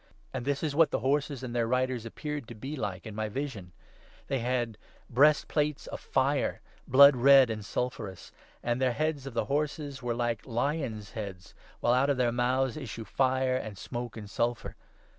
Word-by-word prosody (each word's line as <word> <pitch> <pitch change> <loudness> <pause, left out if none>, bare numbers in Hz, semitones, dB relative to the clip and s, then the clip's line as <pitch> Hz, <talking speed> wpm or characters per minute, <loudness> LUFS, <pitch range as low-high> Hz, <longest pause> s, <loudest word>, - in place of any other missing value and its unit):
And 130 -2 -4
this 140 +1 -1
is 150 -3 0
what 165 +2 +5
the - - -1
horses 140 -1 0
and 130 - -4
17 - - -6
their 120 -1 +1
riders 125 -1 0
appeared 150 +1 -5
to 120 - -9
be 135 +7 -6
like 100 -8 -4
in 110 - -7
my 110 0 -2
vision: 110 -7 -5 0.3
— - - -27
They 135 -2 0
had 120 -2 -1 0.3
breastplates 150 +2 +3
of - - -6
fire, 135 +2 0 0.3
blood 140 +2 +8
red 135 0 +7
and 110 -1 -4
sulphurous, 105 -5 -4 0.3
and 120 +1 0
the 130 -2 +3
heads 150 -1 -1
of 130 - -8
the - - +1
horses 145 -1 -2
were 120 -1 -1
like 120 -2 -1
lions' 120 -4 -2
heads, 100 -5 -7 0.3
while 120 - +3
out 130 +3 +3
of 140 - +2
their 125 -2 +2
mouths 125 +2 +1
issue 115 -5 -6
fire, 130 +2 +1
and 110 -5 -6
smoke, 120 +1 -6
and 105 -2 -7
sulphur. 120 +3 -2
125 Hz, 190 wpm, -29 LUFS, 115-140 Hz, 0.3 s, blood